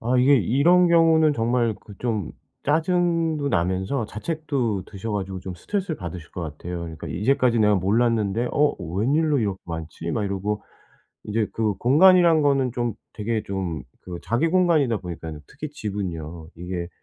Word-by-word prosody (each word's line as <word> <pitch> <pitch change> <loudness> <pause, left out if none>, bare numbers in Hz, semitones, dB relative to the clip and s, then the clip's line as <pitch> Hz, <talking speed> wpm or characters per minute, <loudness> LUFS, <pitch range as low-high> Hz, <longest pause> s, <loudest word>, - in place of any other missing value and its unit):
아 125 +3 +1
이게 135 +3 +6
이런 150 - +4
경우는 160 -2 +5
정말 115 -2 +1
그 105 - -13
좀 110 -8 -2 0.3
짜증도 165 -1 +1
나면서 95 +7 0
자책도 125 - -2
드셔 105 +2 -6
가지고 95 -2 -3
좀 95 -1 -6
스트레스를 185 - -3
받으실 85 -4 -8
것 90 - -6
같아요. 85 +2 -6
그러니까 80 -2 -7
이제까지 120 +4 +2
내가 105 -1 +4
몰랐는데 110 +3 +1
"어 150 0 +2
웬일로 135 - +1
이렇게 100 -4 -1
많지?" 80 0 -5
막 105 - -1
이러고 100 +2 -2 0.6
이제 105 0 0
그 110 -3 0
공간이란 165 - +5
거는 135 -3 +2
좀 120 -3 -2 0.2
되게 110 0 -2
좀 95 -5 -3 0.2
그 90 -2 -6
자기 135 +9 +1
공간이다 160 - +3
보니까요 80 -4 -7
특히 155 -1 -7
집은요 85 - -5
이게 90 0 -5
115 Hz, 340 characters per minute, -24 LUFS, 95-145 Hz, 0.6 s, 이게